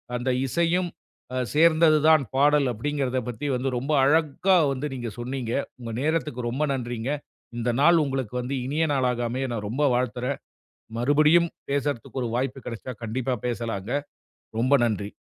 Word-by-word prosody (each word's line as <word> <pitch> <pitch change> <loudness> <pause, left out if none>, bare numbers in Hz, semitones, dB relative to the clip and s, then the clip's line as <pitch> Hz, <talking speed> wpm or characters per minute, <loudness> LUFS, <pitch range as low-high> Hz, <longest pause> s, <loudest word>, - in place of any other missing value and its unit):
அந்த 125 +2 -1 0.2
இசையும் 170 +4 +1 0.5
அ - - -1 0.2
சேர்ந்தது 160 0 +5
தான் 155 -3 +6
பாடல், 145 +1 +4
"அப்டிங்கறத" 130 +2 -1
பத்தி 120 +4 -5
வந்து 130 +2 -1
ரொம்ப 135 +5 -3
அழகா 160 +6 +3
வந்து 135 +3 -2
நீங்க 120 -2 -4
சொன்னீங்க. 120 -1 -3 0.3
உங்க 115 -2 -6
நேரத்துக்கு 145 -5 -1
ரொம்ப 135 +5 -1
நன்றிங்க. 120 0 -3 0.5
இந்த 120 +1 -1
நாள் 170 +2 +6
உங்களுக்கு 130 -4 -3
வந்து 130 +3 -3
இனிய 150 +5 0
நாளாக 125 -3 +1
அமைய 130 +2 -2
நான் 105 -3 -3
ரொம்ப 135 +7 -1
வாழ்த்துறேன். 125 +2 -1 0.6
மறுபடியும் 155 +6 +4 0.2
பேசறதுக்கு 140 -2 -2
ஒரு 120 - -2
வாய்ப்பு 135 +1 -1
கெடச்சா, 120 +2 -6
கண்டிப்பா 125 +3 -1
பேசலாங்க. 115 -3 -3 0.7
ரொம்ப 130 +4 +3
நன்றி. 105 -2 -3
130 Hz, 145 wpm, -25 LUFS, 120-150 Hz, 0.7 s, தான்